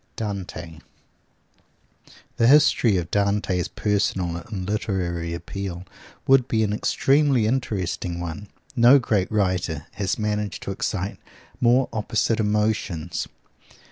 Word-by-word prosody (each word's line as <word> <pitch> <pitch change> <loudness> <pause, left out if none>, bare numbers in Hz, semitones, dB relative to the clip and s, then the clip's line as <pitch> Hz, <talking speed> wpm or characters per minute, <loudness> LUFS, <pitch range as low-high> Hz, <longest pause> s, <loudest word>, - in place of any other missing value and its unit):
DANTE 90 -6 -6 1.6
The 115 - +4
history 125 -6 +5
of 85 -3 -3
Dante's 100 -3 +1
personal 95 -4 -1
and 95 +1 -6
literary 90 -5 -2
appeal 90 +1 -6 0.4
would 130 -2 +5
be 110 -3 +1
an 105 -1 0
extremely 135 +2 +2
interesting 95 -7 -2
one. 85 +4 -6 0.3
No 120 +4 +7
great 105 -7 0
writer 90 -7 0
has 100 -1 -2
managed 105 -1 -2
to - - -4
excite 95 0 -3 0.4
more 125 +2 +4
opposite 110 +1 0
emotions. 105 -6 -1
100 Hz, 110 wpm, -24 LUFS, 90-110 Hz, 1.6 s, No